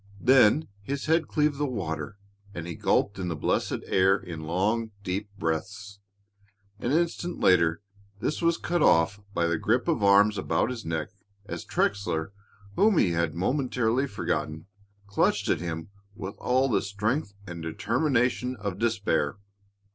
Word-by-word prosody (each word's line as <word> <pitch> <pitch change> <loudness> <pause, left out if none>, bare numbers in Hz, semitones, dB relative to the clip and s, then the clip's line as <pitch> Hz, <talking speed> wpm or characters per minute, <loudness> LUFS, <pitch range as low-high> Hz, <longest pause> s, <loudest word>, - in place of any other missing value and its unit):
Then 130 +5 +5
his 140 +7 -4
head 160 +1 +2
cleaved 150 -2 +1
the 145 - +1
water 100 -3 -4 0.4
and 85 - -5
he 85 - -5
gulped 100 +4 +1
in 90 - -2
the 85 - -2
blessed - - -1
air 95 +1 +3
in 85 -5 -8
long, 100 +8 0
deep 100 +3 -3
breaths. 95 +5 -3 0.8
An 120 - -1
instant 170 +2 0
later 85 +1 +3 0.4
this 150 - -2
was 170 0 +2
cut 175 -1 -1
off 85 - +4 0.2
by 85 - +2
the 85 -1 0
grip 120 +7 +1
of 160 -10 +1
arms 100 +1 +5
about 120 - 0
his 120 -3 -6
neck 80 -2 -3 0.4
as - - -6
Trexler, 100 -4 -1 0.4
whom 210 -3 +4
he 90 - +4
had 85 -1 0
momentarily 125 - 0
forgotten, 80 - -3 0.4
clutched 100 0 +1
at - - +1
him 80 -1 -5 0.3
with 100 -2 -6
all 130 +2 +2
the 120 - +1
strength 105 +3 -2
and 85 -2 -7
determination 125 - 0
of 100 -4 -5
despair. 100 -9 0
100 Hz, 150 wpm, -27 LUFS, 85-125 Hz, 0.8 s, Then